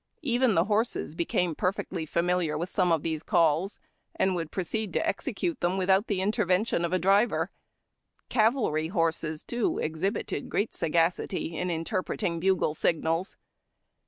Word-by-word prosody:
Even 245 -4 +2
the 165 - +4
horses 215 -4 0
became 170 +1 0
perfectly 180 -1 -2
familiar 170 -1 0
with 175 +3 -4
some 180 -3 +2
of 160 -3 +2
these 160 -2 -2
calls, 170 +1 +2 0.4
and 190 - +2
would 165 -3 -3
pro 190 - -2
ceed 215 +4 -2
to - - 0
execute 335 -6 -2
them 175 +2 0
without 190 +3 +3
the 195 -3 0
intervention 195 -2 +1
of 170 - -1
a 185 - +3
driver. 195 +6 +2 0.8
Cavalry 215 - +2
horses, 165 -3 -1
too, 240 -2 -1
exhibited 165 +7 -2
great 205 +3 -1
sagacity 165 +1 0
in 180 +3 -2
interpreting 170 0 -2
bugle 185 -3 +2
signals. 165 +3 0
180 Hz, 145 wpm, -28 LUFS, 165-200 Hz, 0.8 s, the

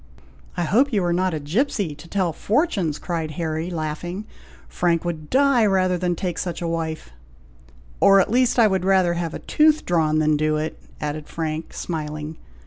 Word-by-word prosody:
"I 175 - +1
hope 250 - +3
you 205 -5 +1
are 175 -1 +1
not 185 -1 +1
a - - -3
gipsey, 185 - -1
to 150 +3 -13
tell 180 -2 0
fortunes!" 200 - 0
cried 165 -3 -3
Harry, 160 0 -2
laughing; 175 +4 -4 0.4
"Frank 170 - 0
would 160 -3 -4
die 275 -2 +4
rather 185 -2 +2
than 175 0 -1
take 175 0 -3
such 175 -3 -3
a 170 - -3
wife." 160 - -3 0.9
"Or, 195 0 +6
at 195 - +1
least, 250 +1 +3
I 235 - +6
would 190 -3 +1
rather 185 -2 +3
have 170 -1 -3
a - - -9
tooth 310 0 +3
drawn 160 -3 +2
than 155 -1 +3
do 155 0 +1
it," 155 +1 -4 0.2
added 150 0 -4
Frank, 160 0 -4
smiling. 155 -1 -5
170 Hz, 180 wpm, -23 LUFS, 155-195 Hz, 0.9 s, Or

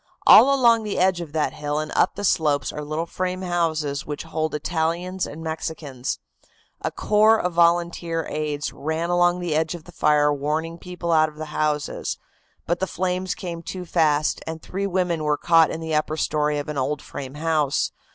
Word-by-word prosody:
All 275 - +9
along 235 -4 +5
the 210 -2 -3
edge 185 -1 +2
of 165 -4 -7
that 155 -2 0
hill 145 0 -3
and 155 0 -3
up - - +3
the 205 - -5
slopes 150 -7 +1
are 150 - -5
little 155 +3 -3
frame 185 +2 -3
houses 160 -5 -1
which 150 -1 -5
hold 160 -1 -2
Italians 170 +4 -1
and 160 +2 -8
Mexicans. 155 -5 -4 0.6
A - - -1
corps 215 +1 +3
of 180 -1 -1
volunteer 170 -1 +2
aides 150 -1 -3
ran 160 +3 -2
along 175 0 +3
the 175 -3 -1
edge 160 +2 0
of 170 - -10
the 175 - -14
fire, 150 -2 +3
warning 155 +4 -2
people 180 -1 -4
out 155 -1 +4
of 150 - -17
the 155 +1 -6
houses. 150 -1 -1 0.5
But 175 +1 0
the 190 - -1
flames 185 +1 -2
ran 170 -2 -4
too 180 +2 -6
fast 155 -3 +1
and 160 0 -4
three 195 +4 -3
women 180 -4 0
were 150 -1 +1
caught 165 0 +4
in 160 - -5
the 160 -1 -3
upper 155 +1 0
story 150 -1 0
of 145 - -4
an 150 -2 -3
old 145 +2 -2
frame 135 0 -7
house. 155 -2 0
160 Hz, 190 wpm, -23 LUFS, 150-175 Hz, 0.6 s, All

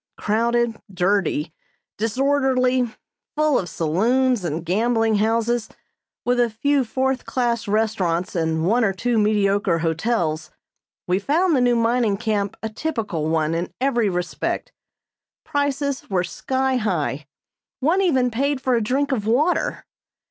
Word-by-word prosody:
Crowded, 230 +1 0
dirty, 180 -4 0 0.5
disorderly, 255 +1 +1 0.5
full 305 -2 +3
of 175 - -5
saloons 225 +9 +1
and 165 0 -3
gambling 225 +4 +2
houses, 225 +2 0 0.6
with 245 0 +2
a 240 -1 +3
few 275 +5 +1
fourth 260 +3 -1
class 235 -4 -1
restaurants 200 -5 0
and 160 -1 0
one 230 +6 +3
or 195 -3 +2
two 235 +4 0
mediocre 200 -4 +2
hotels, 165 0 -1 0.6
we 180 +1 +1
found 320 - +2
the 255 - +2
new 245 -1 +3
mining 230 -3 +2
camp 205 -3 -1
a 220 - -2
typical 215 - -3
one 160 -1 +1
in 170 +2 -2
every 240 -5 +1
respect. 180 -1 -3 0.7
Prices 285 -2 -2
were 185 -3 +1
sky 260 +7 -1
high. 155 - -2 0.5
One 325 +8 +2
even 260 -9 +2
paid 275 +4 0
for 260 -1 0
a 235 - +2
drink 270 +6 0
of 215 -5 -1
water. 295 +10 +1
225 Hz, 135 wpm, -22 LUFS, 190-260 Hz, 0.7 s, full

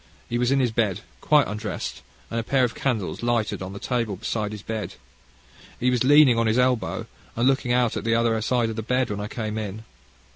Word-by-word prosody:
He 120 - -1
was 125 0 +2
in 135 0 +3
his 125 -3 +2
bed, 110 -3 0 0.2
quite 150 -2 +4
undressed, 105 0 -5 0.3
and 115 - -1
a - - -2
pair 130 +2 +2
of 120 - +1
candles 115 -8 -2
lighted 120 -4 0
on 95 +1 -6
the - - -7
table 115 -2 -1
beside 105 +1 -3
his 105 -2 -8
bed. 110 -2 -4 0.8
He 125 +1 +2
was 125 -1 +1
leaning 140 -3 +6
on 115 - +2
his 110 +2 +2
elbow, 125 -2 +1 0.3
and 120 +2 +2
looking 130 -2 +2
out 120 -2 +2
at - - -3
the 115 0 +2
other 115 -1 +2
side 115 0 +1
of - - -6
the - - -1
bed 125 +1 0
when 105 - -3
I 105 - -3
came 110 -1 -4
in. 105 0 -5
115 Hz, 225 wpm, -24 LUFS, 110-125 Hz, 0.8 s, leaning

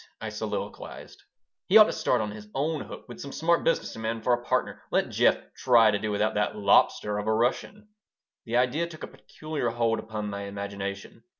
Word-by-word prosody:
I - - -4
soliloquized. - - -6 0.5
"He 195 - +7
ought 215 - +11
to - - -2
start 125 - +1
on 105 -1 -3
his 105 0 -10
own 150 +2 -1
hook - - -10
with 120 - -10
some 140 - -7
smart 170 +3 +1
business 165 - 0
man 115 0 -3
for 125 - +3
a 120 0 -1
partner. - - -1
Let - - 0
Jeff - - +4 0.2
try 115 -4 +5
to 100 - 0
do 110 - -3
without 105 +1 0
that 105 0 0
'lobster' 105 0 +3
of 105 - -5
a 110 - +3
Russian." 160 - -1 0.6
The 115 0 0
idea 130 +7 +1
took 160 -2 -11
a - - -4
peculiar 155 -6 -5
hold 115 -1 0
upon 105 -1 -5
my 100 0 -5
imagination. 100 +2 -6
115 Hz, 200 wpm, -27 LUFS, 105-140 Hz, 0.6 s, ought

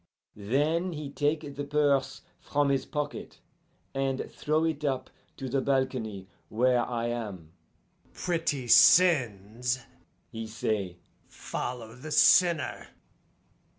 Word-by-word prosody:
Then 150 - 0
he 150 -2 -6
take 145 -1 -1
the 145 - -4
purse 140 -2 +1 0.2
from 145 -1 0
his 135 -1 0
pocket, 145 0 -5 0.6
and 135 -1 -2
throw 155 +1 0
it 160 -2 -1
up 130 -3 -2 0.3
to 135 - -5
the 135 +2 0
balcony 130 -8 -1 0.2
where 125 +2 +2
I 120 -1 -3
am. 100 -9 -6 0.6
'Pretty 165 -7 -2
sins,' 125 - +4 0.5
he 115 -1 -6
say, 105 -4 -3 0.3
'follow 120 -3 -6
the 140 +5 -9
sinner! 165 -3 +3
135 Hz, 110 wpm, -28 LUFS, 115-145 Hz, 0.6 s, sins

